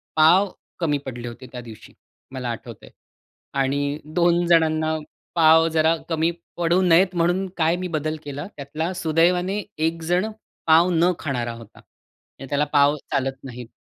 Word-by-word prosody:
पाव 175 +6 +5 0.3
कमी 150 -4 +1
पडले 120 -2 -6
होते 120 +2 -9
त्या 125 -1 -7
दिवशी, 110 -2 -13 0.4
मला 125 -2 -4
आठवतंय. 115 - -9 0.6
आणि 140 +2 0
2 175 +2 +2
जणांना 160 -1 +2 0.4
पाव 160 0 +6
जरा 160 +1 +4
कमी 165 +1 +1 0.3
पडू 175 +2 +2
नयेत, 180 +1 +4
म्हणून 175 +3 +1
काय 160 +1 +2
मी - - -2
बदल 155 +1 -2
केला 145 +4 -6
त्यातला, 155 +5 -4
सुदैवाने 180 +5 +1
एकजण 165 +4 0 0.4
पाव 165 +3 +6
न 170 +2 +3
खाणारा 120 -5 -3
होता. 115 -2 -13
आणि 135 - -17
त्याला 145 +1 +1
पाव 145 +1 +5 0.2
चालत 135 0 -2
नाहीत. 125 -2 -8
160 Hz, 145 wpm, -23 LUFS, 140-170 Hz, 0.6 s, पाव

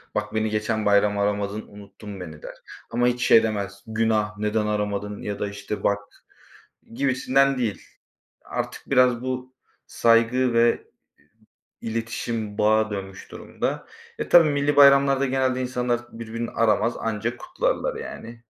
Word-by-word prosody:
Bak, 105 0 -2
beni 110 0 +1
geçen 110 0 -1
bayram 105 0 +3
aramadın, 100 +1 -1
unuttun 100 0 -11
beni, 80 -4 -9
der. - - -9 0.3
Ama 120 +1 +1
hiç 125 0 0
şey 115 - +7
demez: 100 -2 -3
Günah, 110 -1 0
neden 105 0 0
aramadın 105 -1 -2
ya 100 -1 -5
da, - - -1
işte, 100 +1 -6
bak, 100 0 +2 1.0
gibisinden 135 +1 +2
değil. 115 -5 -2 0.6
Artık - - -6
biraz 125 -3 +4
bu 130 0 -4 0.3
saygı 115 +2 +3
ve 115 0 +2 0.9
iletişim 115 -1 -4
bağa 110 +1 +3
dönmüş 95 -1 -7
durumda. - - -4 0.3
E, - - -4
tabii, 165 -3 +7
millî 145 0 0
bayramlarda 140 -1 +6
genelde 130 -1 0
insanlar 125 -1 -1
birbirini 115 +1 -5
aramaz, 115 +1 +1
anca 115 +1 -2
kutlarlar - - -2
yani. 115 - -9
115 Hz, 135 wpm, -24 LUFS, 105-125 Hz, 1.0 s, şey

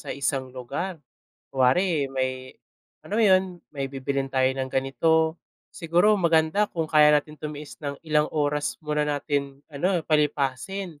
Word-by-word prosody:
sa - - -11
isang 135 -1 -2
lugar, 140 +9 -5 0.5
kunwari 145 +5 +2
may 130 -1 -3 0.5
alam 210 - -5
mo 225 - +4
'yun, 190 -2 +5 0.3
may 140 -2 -3
bibilhin 135 0 -3
tayo 130 -1 +1
ng 130 0 -3
ganito, 160 +5 +1 0.3
siguro 175 +5 +3
maganda 165 +4 +3
kung 165 -2 -2
kaya 155 -1 +5
natin 150 +1 -5
tumiis 150 -1 -7
ng 140 -2 -4
ilang 150 -1 +2
oras 145 -5 0
muna 150 0 0
natin 145 -1 -2
ano 175 +3 0
palipasin 150 +3 -1
150 Hz, 140 wpm, -25 LUFS, 135-165 Hz, 0.5 s, yun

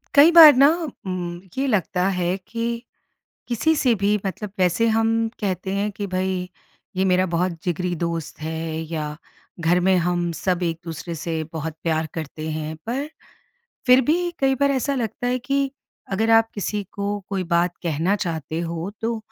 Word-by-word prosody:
कई 300 +4 +8
बार 315 -4 +10
ना 275 +2 +7 0.4
ये - - -2
उम, 180 +8 -4
लगता 185 -3 +1
है 180 -1 0
कि, 230 +4 -4 0.7
किसी 245 +7 +2
से 255 -5 +3
भी 205 0 +2
मतलब 200 +2 -4
वैसे 185 +5 +3
हम 225 0 +2 0.3
कहते 190 -2 -2
हैं 205 +1 0
कि 205 - -3
भई 185 -1 -2 0.5
ये 190 - +2
मेरा 185 0 +3
बहुत 180 +2 +1
जिगरी 180 0 -1
दोस्त 165 -2 -4
है 160 0 -3
या 150 -2 -3 0.4
घर 175 +2 +3
में 190 - +5
हम 175 0 0
सब 180 +2 -1
एक-दूसरे 165 0 -4
से 160 0 -3
बहुत 160 0 -4
प्यार 160 -1 0
करते 155 0 -5
हैं। 155 0 -4
पर, 270 +5 -2 0.8
फिर 250 +1 +7
भी 350 +2 +2
कई 270 -1 +3
बार 280 +1 +2
ऐसा 275 +1 0
लगता 245 0 -2
है 250 +1 0
कि, 275 +2 0 0.4
अगर 220 +4 +1
आप 225 0 -2
किसी 205 0 -2
को 205 0 -2
कोई 195 -2 -1
बात 175 +1 +1
कहना 170 +4 +1
चाहते 160 -1 -3
हो, 170 +1 -3
तो 230 0 -1
185 Hz, 170 wpm, -23 LUFS, 170-230 Hz, 0.8 s, बार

